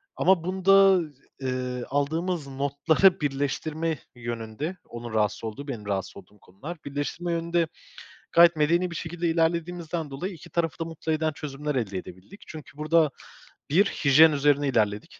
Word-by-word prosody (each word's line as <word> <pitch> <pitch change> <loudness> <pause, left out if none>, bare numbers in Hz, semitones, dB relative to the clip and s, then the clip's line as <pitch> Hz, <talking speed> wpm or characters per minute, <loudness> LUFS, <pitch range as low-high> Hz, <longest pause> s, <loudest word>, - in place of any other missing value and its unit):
ama 185 -3 +3
bunda, 190 +1 +5 0.4
eee, 125 -1 -3
aldığımız 160 +3 -1
notları 145 +7 +2
birleştirme 150 +3 -2 0.2
yönünde, 120 +8 -5
onun 120 -1 -7
rahatsız 105 -1 0
olduğu, 115 +6 -6
benim 115 -7 -6
rahatsız 100 -2 -3
olduğum 100 +2 -15
konular, 140 - -9
birleştirme 145 +5 -3
yönünde 170 0 0 0.7
gayet 170 0 +7
medeni 170 +4 +2
bir 170 - -6
şekilde 170 +2 -3
ilerlediğimizden 165 -1 -1
dolayı 180 +8 -5
2 160 - -14
tarafı 165 -2 -1
da 165 - -2
mutlu 160 -1 -4
eden 155 0 0
çözümler 150 0 -5
elde 105 -7 -2
edebildik. 95 - -11
Çünkü 155 -2 -11
burada 155 0 +3 0.6
bir 180 +8 +4
hijyen 155 -3 +5
üzerine 145 0 +2
ilerledik. 105 -5 -1
150 Hz, 140 wpm, -26 LUFS, 135-170 Hz, 0.7 s, gayet